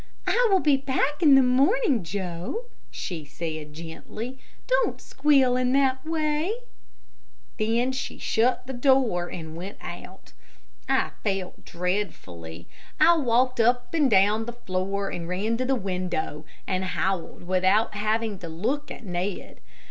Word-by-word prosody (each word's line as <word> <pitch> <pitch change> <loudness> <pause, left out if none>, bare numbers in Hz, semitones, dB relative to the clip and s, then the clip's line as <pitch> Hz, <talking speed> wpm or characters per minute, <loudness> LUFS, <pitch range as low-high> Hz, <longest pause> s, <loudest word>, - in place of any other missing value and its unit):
"I - - +3
will 385 -2 +5
be 290 -3 +4
back 275 +3 -1
in 295 -5 +7
the 270 - +7
morning, 270 - +3
Joe," 180 - -4 0.2
she 170 -4 -5
said, 155 0 -6
gently; 215 +10 -7 0.3
"don't - - +1
squeal 270 -3 +3
in 255 0 +1
that 265 -1 +2
way," 315 +3 0 1.1
Then 230 +4 +1
she 260 - -4
shut 240 +4 +1
the 265 - -6
door 245 -9 +2
and 160 -2 -7
went 185 +4 -7
out. - - -10 0.6
I - - +2
felt 195 -3 -3
dreadfully. 95 - -4 0.3
I 330 +2 +7
walked 255 -2 +2
up 245 +4 +2
and 300 -5 +3
down 210 +2 +4
the 240 - -5
floor 195 -2 -2
and 170 -1 -5
ran 205 +5 0
to 255 - -1
the 270 +1 +2
window, 180 - -3 0.2
and 185 -1 -1
howled 190 -1 -2
without 185 +5 +2
having 215 0 -1
to 170 - -7
look 245 - -2
at - - -9
Ned. 180 +1 -4
220 Hz, 140 wpm, -26 LUFS, 180-265 Hz, 1.1 s, in